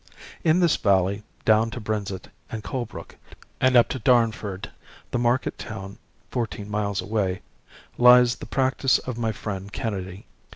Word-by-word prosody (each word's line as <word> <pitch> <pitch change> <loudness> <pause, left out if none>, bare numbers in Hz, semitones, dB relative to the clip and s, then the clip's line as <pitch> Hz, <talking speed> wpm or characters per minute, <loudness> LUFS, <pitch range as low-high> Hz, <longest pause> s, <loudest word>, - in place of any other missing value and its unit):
In 165 +3 +4
this 170 -3 +3
valley 100 0 +2 0.2
down 110 +1 +4
to 120 - -6
Brenzett 105 -4 -4 0.2
and 110 -1 -6
Colebrook 120 -1 -6 0.4
and 130 0 +3
up 120 - +7
to 130 - -3
Darnford, 110 -5 +1 0.4
the 120 - 0
market 120 +2 0
town 100 -3 -7 0.3
fourteen 105 -4 -3
miles 100 -2 -1
away, 95 -2 -1 0.6
lies 125 0 +7
the - - -9
practice 130 0 +2
of 125 -2 -6
my 115 -1 0
friend 100 -2 -6
Kennedy. 95 -3 -4
110 Hz, 140 wpm, -24 LUFS, 100-125 Hz, 0.6 s, up